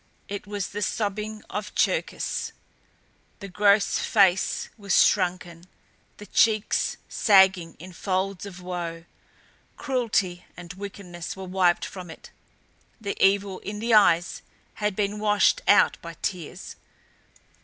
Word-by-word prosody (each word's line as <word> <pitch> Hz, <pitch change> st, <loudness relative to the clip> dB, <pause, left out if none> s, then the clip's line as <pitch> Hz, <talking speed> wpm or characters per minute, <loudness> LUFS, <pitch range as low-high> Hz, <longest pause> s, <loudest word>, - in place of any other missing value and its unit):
It 200 Hz, 0 st, -6 dB
was 205 Hz, -2 st, -4 dB
the 210 Hz, -, -5 dB
sobbing 215 Hz, +1 st, -3 dB
of 210 Hz, 0 st, -6 dB
Cherkis! -, -, -1 dB, 0.9 s
The 200 Hz, -, -7 dB
gross 200 Hz, +2 st, +3 dB
face 190 Hz, -3 st, +2 dB
was 200 Hz, -4 st, +3 dB
shrunken, 175 Hz, -3 st, -1 dB, 0.5 s
the 205 Hz, -, -10 dB
cheeks 215 Hz, 0 st, +1 dB
sagging 190 Hz, -5 st, +4 dB
in 180 Hz, +3 st, -11 dB
folds 190 Hz, +2 st, -2 dB
of 180 Hz, -2 st, -10 dB
woe; 170 Hz, -2 st, -5 dB, 0.7 s
cruelty 225 Hz, -10 st, -1 dB
and 175 Hz, 0 st, -9 dB
wickedness 190 Hz, -3 st, -8 dB
were 190 Hz, -, -7 dB
wiped 185 Hz, -1 st, +1 dB
from 180 Hz, -3 st, -9 dB
it; 160 Hz, -, -12 dB, 0.7 s
the 200 Hz, -3 st, -4 dB
evil 195 Hz, -1 st, +2 dB
in 210 Hz, +1 st, -6 dB
the 230 Hz, +2 st, -1 dB
eyes 175 Hz, -5 st, +4 dB, 0.4 s
had 210 Hz, -2 st, 0 dB
been 205 Hz, 0 st, -1 dB
washed 210 Hz, -, +3 dB
out -, -, +5 dB
by -, -, -9 dB
tears. 175 Hz, -5 st, -5 dB
195 Hz, 120 wpm, -25 LUFS, 180-210 Hz, 0.9 s, out